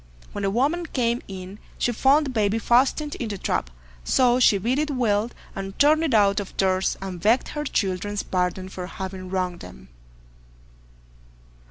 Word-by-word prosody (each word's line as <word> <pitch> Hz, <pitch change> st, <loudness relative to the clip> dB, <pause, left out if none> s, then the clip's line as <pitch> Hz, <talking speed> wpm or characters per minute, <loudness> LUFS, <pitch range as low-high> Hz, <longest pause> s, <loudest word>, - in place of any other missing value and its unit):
When 205 Hz, -, -5 dB
the 195 Hz, -, +1 dB
woman 290 Hz, -, 0 dB
came 240 Hz, -3 st, 0 dB
in, 190 Hz, +1 st, -8 dB, 0.2 s
she 245 Hz, -, +1 dB
found 275 Hz, +6 st, +3 dB
the 270 Hz, -, -3 dB
baby 215 Hz, -2 st, +1 dB
fastened 260 Hz, +6 st, +2 dB
in 235 Hz, -, -3 dB
the 205 Hz, -, -4 dB
trap, 60 Hz, -, -2 dB, 0.3 s
so 250 Hz, -, +3 dB
she 220 Hz, -5 st, +5 dB
beat 240 Hz, +8 st, 0 dB
it 305 Hz, 0 st, 0 dB
well, 230 Hz, -5 st, +1 dB, 0.3 s
and 195 Hz, 0 st, -6 dB
turned 305 Hz, +2 st, +5 dB
it 285 Hz, -8 st, +1 dB
out 200 Hz, -1 st, +4 dB
of 200 Hz, -, -8 dB
doors, 190 Hz, 0 st, +1 dB
and 185 Hz, -3 st, -6 dB
begged 225 Hz, +5 st, +2 dB
her 295 Hz, 0 st, -4 dB
children's 205 Hz, -3 st, -1 dB
pardon 180 Hz, 0 st, -1 dB
for 185 Hz, -1 st, -7 dB
having 190 Hz, -1 st, -7 dB
wronged 180 Hz, -2 st, -2 dB
them. 65 Hz, 0 st, -12 dB
205 Hz, 170 wpm, -24 LUFS, 190-255 Hz, 0.3 s, she